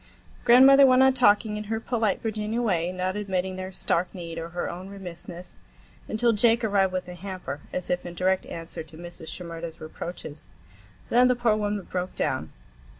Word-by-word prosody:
Grandmother 265 +3 +8
went 255 0 +6
on 265 0 +5
talking 210 -3 +3
in 210 - -5
her 220 +1 -2
polite 225 -2 -1
Virginia 220 +1 -2
way, 180 -7 +1
not 185 +1 -2
admitting 190 -2 -2
their 185 0 -5
stark 180 -1 0
need 165 -2 -6
or 165 0 -6
her 175 +1 -3
own 185 +2 -7
remissness, 180 -2 -9 0.5
until 230 +2 +2
Jake 230 +2 +3
arrived 200 -3 +2
with 185 0 -2
the 180 - -8
hamper, 180 -5 -6
as 180 - -3
if 180 0 -1
in 175 0 -8
direct 185 +1 +1
answer 165 0 -6
to 155 0 -13
Mrs. 170 -1 -9
Shimerda's 170 -2 -7
reproaches. 155 -1 -8 0.6
Then 250 +1 +5
the 250 - +3
poor 235 -3 +2
woman 205 -2 -1
broke 180 0 -4
down. - - -2
190 Hz, 180 wpm, -26 LUFS, 175-220 Hz, 0.6 s, Grandmother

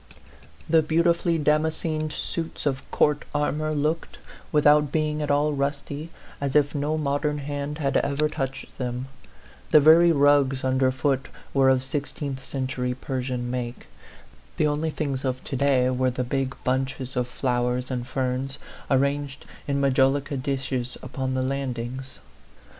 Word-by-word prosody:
The 160 0 +5
beautifully 170 +2 +2
damas 155 +1 +2
cened 155 -2 -2
suits 165 0 -4
of 135 -2 -2
court 150 -1 +2
armor 150 +1 0
looked, 155 +2 -1 0.3
without 150 -1 +5
being 155 -1 0
at 150 - -2
all 145 +1 +2
rusty, 145 +2 -3 0.3
as 140 -2 -2
if 145 -1 +4
no 150 +1 0
modern 150 0 0
hand 145 +1 -4
had 140 -3 -1
ever 145 +2 +1
touched 135 -4 -5
them; 125 +1 -3 0.6
the 155 - +7
very 165 +3 +7
rugs 140 -3 +3
under 130 0 +2
foot 135 0 0 0.3
were 135 -1 +5
of 130 -1 +3
sixteenth 140 0 -4
century 130 -2 -2
Persian 125 -2 -3
make; 125 -1 -4 0.7
the - - +3
only 150 +2 0
things 140 -4 -3
of 130 -1 -2
to 140 - -4
day 135 -1 +3
were 130 0 +1
the 125 0 -2
big 135 +1 -2
bunches 130 0 -1
of 125 -1 0
flowers 125 0 -1
and 125 -1 -3
ferns, 130 +1 -2 0.3
arranged 140 +1 0 0.2
in 140 -1 0
majolica 135 +1 +2
dishes 130 -2 -2
upon 130 0 -3
the 130 - 0
landings. 130 -1 -4
140 Hz, 145 wpm, -25 LUFS, 130-150 Hz, 0.7 s, the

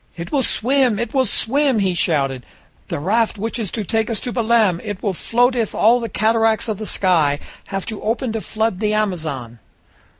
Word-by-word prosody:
"It 170 0 -6
will 280 - +2
swim, 255 -1 +2
it 235 +6 -3
will 260 -3 +2
swim!" 270 +4 +2
he 190 -3 +1
shouted. 135 -7 0 0.4
"The - - -3
raft 220 +8 +1
which 225 +4 -3
is 215 -5 -3
to 215 - -3
take 225 +3 -1
us 225 -3 -2
to 245 - -4
Belem! 225 -7 +2
It 205 -3 -6
will 200 -3 0
float 245 +7 +1
if 230 -4 -1
all 230 +4 +4
the 230 -1 -4
cataracts 220 +2 +1
of 215 -3 -3
the 215 - -4
sky 160 -7 +2 0.3
have 195 -1 -4
to 220 -3 -6
open 230 +3 -1
to 220 0 -3
flood 220 -4 -2
the 215 0 +1
Amazon!" 155 - -3
220 Hz, 200 wpm, -20 LUFS, 185-235 Hz, 0.4 s, all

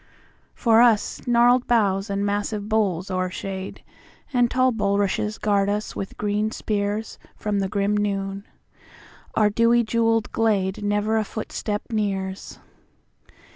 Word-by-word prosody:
For 230 -1 +4
us 230 -4 +3
gnarled 245 +1 +4
boughs 200 -5 +2
and 200 0 -1
massive 205 0 -2
boles 195 -4 0
o'ershade, 185 +1 -4 0.5
And 245 -1 +3
tall 255 +1 +3
bulrushes 205 -1 0
guard 200 -1 +1
us 210 +1 -3
with 195 - -6
green 210 +1 0
spearsFrom 210 -1 -3
the 195 -1 -1
grim 200 0 0
noon; 200 -1 -2 0.9
our 210 -1 +3
dewy 230 +2 +3
jewelled 225 -1 +1
gladeNever 205 0 +1
a - - 0
footstep 210 0 -4
nears. 195 -3 -3
205 Hz, 115 wpm, -23 LUFS, 200-225 Hz, 0.9 s, For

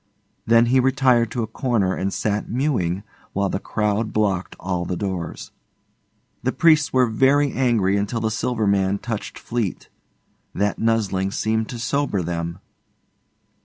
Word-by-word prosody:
Then 115 +1 +6
he 130 - +6
retired 130 -3 +3
to 120 +1 -2
a - - 0
corner 110 -4 0
and 95 +1 -2
sat 105 0 -2
mewing 110 - 0 0.3
while 100 0 0
the 95 - -2
crowd 105 +1 -1
blocked 100 -4 0
all 90 -1 -2
the 90 - -3
doors. 95 -4 -4 0.9
The - - 0
priests 155 -3 +4
were 130 -1 +4
very 135 +5 +3
angry 110 -7 +2
until 105 +3 -1
the 110 0 0
Silver 115 0 -1
Man 100 0 +2
touched 115 0 -5
Fleete. 115 -6 -3 0.7
That 100 0 0
nuzzling 105 -4 +1
seemed 110 +2 -1
to 120 - -5
sober 115 -3 -1
them. 85 0 -3
110 Hz, 145 wpm, -22 LUFS, 95-120 Hz, 0.9 s, Then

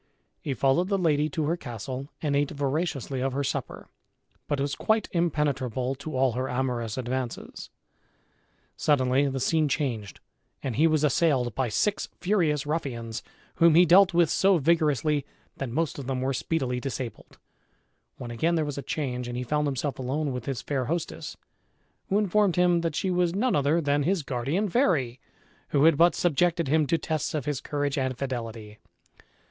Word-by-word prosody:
He 140 - -3
followed 135 +8 +2
the 200 - +2
lady 155 -4 +2
to 160 -3 -2
her 165 +3 +1
castle 130 - -6
and 145 -2 +1
ate 145 0 +1
voraciously 140 -2 -2
of 135 0 -1
her 140 +1 -1
supper, - - -4 0.6
but 145 - -1
was 140 +1 -1
quite 220 0 +1
impenetrable 140 -7 0
to 140 +1 -6
all 130 -1 +3
her 130 +3 -3
amorous 125 -3 -2
advances. 130 -1 -4 1.1
Suddenly 135 -1 +2
the 135 0 -3
scene 155 +4 +2
changed 120 -9 -2 0.4
and 130 -5 -2
he 155 +4 +4
was 155 -2 +2
assailed 140 -6 +2
by 130 0 -1
six 205 - 0
furious 165 -8 +1
ruffians, 120 -7 -3 0.4
whom 165 -1 +5
he 175 +2 +7
dealt 185 +2 +6
with 170 -2 +3
so 195 -1 +4
vigorously 150 -2 +2 0.3
that 135 - -4
most 155 +4 -1
of 135 - -7
them 130 -1 -1
were 135 +1 0
speedily 130 -4 -1
disabled, 130 -2 -6 0.8
when 120 - -7
again 165 +9 +1
there 160 -2 +1
was 145 -1 -4
a - - -4
change 125 -5 -3
and 120 0 -4
he 125 - -2
found 150 +3 0
himself 140 0 -2
alone 140 +3 -1
with 125 0 -5
his 135 -3 -3
fair 135 -3 -1
hostess, 165 +5 -4 0.7
who 195 - +2
informed 210 -2 +2
him 175 -1 +3
that 165 -3 -2
she 190 - 0
was 180 -1 +1
none 245 +5 +1
other 145 +3 +2
than 145 -2 +1
his 170 +2 0
guardian 140 - -1
fairy, 160 - +1 0.5
who 140 -1 +2
had 165 -1 +6
but 170 +4 +4
subjected 170 -1 +1
him 155 +1 +2
to 165 - +2
tests 155 -1 -2
of 150 - -2
his 145 -3 -2
courage 145 -1 -2
and 130 -1 -1
fidelity. 115 -5 -5
145 Hz, 175 wpm, -27 LUFS, 130-165 Hz, 1.1 s, he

